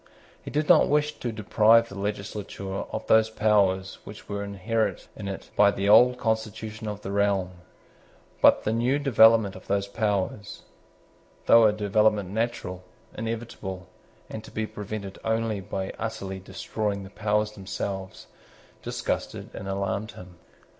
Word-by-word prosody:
He -, -, -8 dB
did 150 Hz, +1 st, -1 dB
not 175 Hz, -3 st, +6 dB
wish 150 Hz, 0 st, +1 dB
to 120 Hz, -, -3 dB
deprive 110 Hz, +1 st, +4 dB
the 100 Hz, -, -8 dB
legislature 100 Hz, -1 st, -5 dB, 0.2 s
of -, -, -4 dB
those 110 Hz, 0 st, +4 dB
powers 100 Hz, -4 st, +1 dB
which 105 Hz, +1 st, -11 dB
were 100 Hz, 0 st, -3 dB
inherent 100 Hz, 0 st, -2 dB
in 100 Hz, -, -7 dB
it 95 Hz, -1 st, -7 dB
by 105 Hz, -1 st, +6 dB
the 100 Hz, 0 st, -1 dB
old 125 Hz, +4 st, +7 dB
constitution 110 Hz, -1 st, -3 dB
of 105 Hz, -1 st, -5 dB
the 95 Hz, -, -5 dB
realm: 100 Hz, -2 st, +1 dB, 0.9 s
but -, -, +6 dB
the 110 Hz, -, 0 dB
new 120 Hz, +4 st, +2 dB
development 115 Hz, -7 st, +5 dB
of 95 Hz, -, -12 dB
those 100 Hz, 0 st, 0 dB
powers, 105 Hz, 0 st, -2 dB, 0.8 s
though 115 Hz, -1 st, +7 dB
a 105 Hz, -, +5 dB
development 105 Hz, -1 st, +1 dB
natural, 110 Hz, -5 st, -3 dB, 0.3 s
inevitable, 110 Hz, -5 st, -5 dB, 0.4 s
and 110 Hz, -, -7 dB
to -, -, -11 dB
be 110 Hz, -, -3 dB
prevented 105 Hz, -2 st, -7 dB
only 110 Hz, -2 st, 0 dB
by 95 Hz, 0 st, -4 dB
utterly 95 Hz, -4 st, -4 dB
destroying 100 Hz, +2 st, -4 dB
the 95 Hz, -, -11 dB
powers 105 Hz, 0 st, 0 dB
themselves, 95 Hz, -1 st, -6 dB, 0.6 s
disgusted -, -, -4 dB
and 95 Hz, -, -7 dB
alarmed 100 Hz, +2 st, -2 dB
him. 90 Hz, -5 st, -13 dB
105 Hz, 145 wpm, -26 LUFS, 100-110 Hz, 0.9 s, old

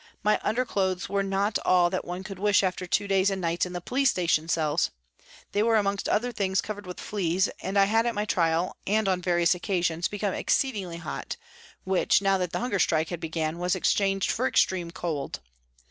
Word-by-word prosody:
My 210 Hz, 0 st, +3 dB
underclothes 195 Hz, -6 st, -1 dB
were 200 Hz, 0 st, +1 dB
not 195 Hz, +2 st, 0 dB
all 175 Hz, -1 st, +4 dB
that 185 Hz, -, -2 dB
one 180 Hz, +2 st, -6 dB
could 195 Hz, -2 st, -8 dB
wish 205 Hz, 0 st, +3 dB
after 185 Hz, -1 st, -2 dB
two 200 Hz, -, 0 dB
days 195 Hz, 0 st, +3 dB
and 195 Hz, -1 st, -2 dB
nights 170 Hz, 0 st, 0 dB
in 180 Hz, -, -9 dB
the 175 Hz, -, -3 dB
police 270 Hz, +8 st, +2 dB
station 165 Hz, -2 st, +1 dB
cells. 155 Hz, -3 st, +1 dB, 0.6 s
They 205 Hz, -, +1 dB
were 225 Hz, +1 st, +3 dB
amongst 200 Hz, -2 st, 0 dB
other 245 Hz, +4 st, +1 dB
things 195 Hz, -4 st, 0 dB
covered 205 Hz, -2 st, -5 dB
with 180 Hz, -, -7 dB
fleas, 185 Hz, -2 st, 0 dB
and 195 Hz, +1 st, -2 dB
I 200 Hz, -, +7 dB
had 225 Hz, +3 st, +2 dB
at 235 Hz, -, -1 dB
my 210 Hz, +1 st, -1 dB
trial, 170 Hz, -2 st, +1 dB
and 215 Hz, +1 st, +2 dB
on 185 Hz, -1 st, +1 dB
various 175 Hz, -1 st, +3 dB
occasions, 175 Hz, -2 st, -1 dB
become 205 Hz, -2 st, -2 dB
exceedingly 200 Hz, -11 st, -1 dB
hot, 170 Hz, -3 st, -6 dB, 0.5 s
which, 190 Hz, -1 st, +3 dB
now 195 Hz, -1 st, +2 dB
that 180 Hz, -2 st, -2 dB
the -, -, -2 dB
hunger 235 Hz, -5 st, -1 dB
strike 160 Hz, -2 st, +2 dB
had 175 Hz, -, -4 dB
begun, 160 Hz, 0 st, -3 dB
was 180 Hz, +1 st, +1 dB
exchanged 195 Hz, +1 st, +1 dB
for 255 Hz, +3 st, 0 dB
extreme 180 Hz, -8 st, +1 dB
cold. 165 Hz, -5 st, -4 dB
190 Hz, 200 wpm, -27 LUFS, 175-205 Hz, 0.6 s, I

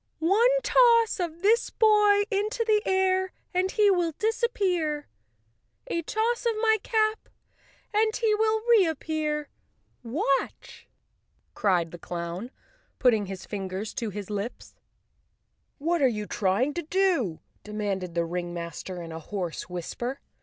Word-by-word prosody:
"One 395 Hz, +10 st, +4 dB
toss 465 Hz, -3 st, +4 dB
of 340 Hz, 0 st, -4 dB
this 450 Hz, +4 st, +3 dB
boy 420 Hz, -2 st, +4 dB
into 425 Hz, +4 st, 0 dB
the 430 Hz, -1 st, +3 dB
air, 375 Hz, 0 st, +1 dB, 0.2 s
and 365 Hz, +1 st, +1 dB
he 415 Hz, 0 st, +4 dB
will 350 Hz, -3 st, +1 dB
dis¬ 445 Hz, +9 st, -1 dB
appear; 350 Hz, -10 st, 0 dB, 0.8 s
a 335 Hz, -, -2 dB
toss 450 Hz, +7 st, -1 dB
of 465 Hz, -, +2 dB
my 440 Hz, -1 st, +4 dB
cap 435 Hz, 0 st, 0 dB, 0.6 s
and 435 Hz, +1 st, +2 dB
he 450 Hz, -3 st, +2 dB
will 435 Hz, 0 st, +1 dB
reappear. 315 Hz, -, +1 dB, 0.5 s
Watch! 270 Hz, +3 st, -2 dB, 0.3 s
" -, -, -45 dB
cried 180 Hz, -5 st, +1 dB
the 175 Hz, -, -9 dB
clown, 170 Hz, +6 st, -5 dB, 0.5 s
putting 220 Hz, -6 st, +3 dB
his 190 Hz, -1 st, -7 dB
fingers 195 Hz, +1 st, -5 dB
to 230 Hz, -, -3 dB
his 205 Hz, 0 st, -7 dB
lips. 205 Hz, +4 st, -5 dB, 1.0 s
"What 335 Hz, +3 st, 0 dB
are 270 Hz, -, +6 dB
you 210 Hz, -4 st, -2 dB
trying 205 Hz, +9 st, 0 dB
to 345 Hz, -, -3 dB
do?" 335 Hz, -, +1 dB, 0.2 s
demanded 200 Hz, -4 st, -3 dB
the 170 Hz, -, +2 dB
ring¬ 175 Hz, +1 st, -3 dB
master 170 Hz, +1 st, -6 dB
in 165 Hz, -, -8 dB
a 160 Hz, -, -6 dB
hoarse 175 Hz, 0 st, -5 dB
whisper. 240 Hz, +9 st, -4 dB
310 Hz, 140 wpm, -27 LUFS, -, 1.0 s, are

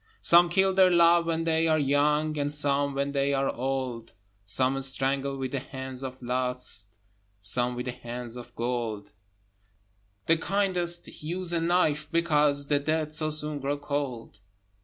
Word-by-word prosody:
Some 175 Hz, 0 st, +6 dB
kill 190 Hz, +2 st, +2 dB
their 190 Hz, -1 st, +5 dB
love 170 Hz, -1 st, +4 dB
when 165 Hz, 0 st, -1 dB
they 165 Hz, 0 st, +1 dB
are 155 Hz, -1 st, +3 dB
young, 150 Hz, +2 st, +1 dB
And 145 Hz, -1 st, -2 dB
some 145 Hz, -1 st, +1 dB
when 140 Hz, +1 st, -1 dB
they 140 Hz, 0 st, 0 dB
are 135 Hz, 0 st, 0 dB
old; 125 Hz, -2 st, -4 dB, 0.3 s
Some 130 Hz, +5 st, +1 dB
strangle 135 Hz, +1 st, 0 dB
with 130 Hz, -1 st, -4 dB
the 140 Hz, -, -2 dB
hands 130 Hz, -1 st, -7 dB
of 130 Hz, -1 st, -7 dB
Lust, 125 Hz, -4 st, -2 dB, 0.4 s
Some 120 Hz, +5 st, 0 dB
with 125 Hz, -, -5 dB
the 125 Hz, -, -3 dB
hands 120 Hz, -1 st, -7 dB
of 120 Hz, 0 st, -11 dB
Gold: 115 Hz, -4 st, -3 dB, 1.1 s
The 165 Hz, -, +3 dB
kindest 180 Hz, -2 st, 0 dB
use 175 Hz, +3 st, -1 dB
a 170 Hz, -, 0 dB
knife, 155 Hz, -3 st, +1 dB
because 150 Hz, -4 st, +2 dB
The 145 Hz, 0 st, +1 dB
dead 155 Hz, +1 st, -2 dB
so 155 Hz, 0 st, +3 dB
soon 150 Hz, -1 st, 0 dB
grow 140 Hz, +1 st, -2 dB
cold. 140 Hz, -7 st, -5 dB
140 Hz, 160 wpm, -27 LUFS, 130-160 Hz, 1.1 s, Some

